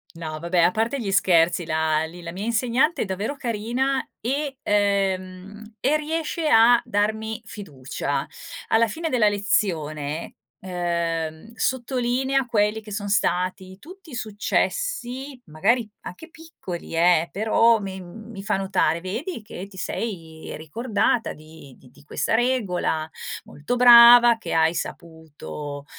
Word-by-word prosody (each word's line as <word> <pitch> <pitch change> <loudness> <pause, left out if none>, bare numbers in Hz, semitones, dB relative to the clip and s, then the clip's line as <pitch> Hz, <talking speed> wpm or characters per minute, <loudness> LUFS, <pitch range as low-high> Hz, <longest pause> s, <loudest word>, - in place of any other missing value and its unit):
No, 155 -2 -6
vabbè 170 +2 0
a 170 +1 +5
parte 225 +7 -1
gli 215 -5 -3
scherzi 175 -2 +3
la, 160 -1 +1
lì 170 +2 -8
la 170 0 -7
mia 190 +3 -5
insegnante 240 +7 +1
è - - -5
davvero 205 +9 -4
carina 245 +4 -1
e 275 +3 -2
ehm, 200 0 -1
e 290 +4 +2
riesce 315 +1 -2
a 235 0 +6
darmi 220 +2 -1
fiducia. 140 -7 -4 0.4
Alla 230 +1 +3
fine 325 +9 -4
della 230 -6 +3
lezione 160 -7 -2 0.2
ehm, 170 +1 -3
sottolinea 260 +1 0
quelli 215 -1 +1
che 210 - -12
sono 205 0 -4
stati 185 -1 -1
tutti 365 - -13
successi, 255 - -2
magari 215 +9 0
anche 320 - -10
piccoli 315 - -9
eh, 170 0 +3
però 225 +2 +3
mi 190 -2 -6
mi 205 +3 -10
fa 205 -1 0
notare: 190 -4 +1
"Vedi 225 - -5
che 195 -3 -8
ti 195 -1 -15
sei 165 -6 -5
ricordata 220 - -1
di 155 -3 -15
di 130 - -19
di 145 +3 -21
questa 155 - -1
regola, 195 -10 0 0.4
molto 150 +12 -4
brava 240 -1 +9
che 225 - -7
hai 160 +1 +3
saputo", 150 -4 -7
205 Hz, 130 wpm, -23 LUFS, 170-240 Hz, 0.4 s, brava